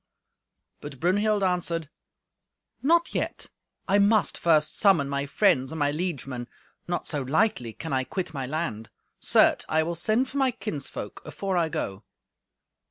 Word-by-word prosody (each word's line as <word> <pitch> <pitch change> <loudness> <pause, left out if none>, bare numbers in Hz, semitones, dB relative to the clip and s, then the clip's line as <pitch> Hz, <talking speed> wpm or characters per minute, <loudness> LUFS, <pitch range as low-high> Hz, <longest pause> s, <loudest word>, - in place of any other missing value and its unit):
But 145 -3 -9
Brunhild 205 +4 +2
answered, 175 -3 0 0.9
"Not 335 +5 +3
yet; - - -3 0.4
I 200 +1 +4
must 205 +1 +3
first 155 -2 +2
summon 190 -9 +4
my 140 0 -2
friends 140 -5 +2
and 160 - -5
my 145 -2 +1
liegemen. 140 -7 -4 0.4
Not 175 0 -2
so 145 -3 -2
lightly 135 - 0
can 160 +4 -6
I 130 0 +1
quit 175 +3 -4
my 135 -3 -4
land. 135 -7 -3 0.3
Certes, - - +4
I 160 0 +3
will 170 +2 -2
send 215 +9 +1
for 275 - -6
my 265 -1 +3
kinsfolk 150 - -6
afore 195 -1 -3
I 170 -2 +2
go." 100 -7 -4
165 Hz, 150 wpm, -26 LUFS, 140-200 Hz, 0.9 s, I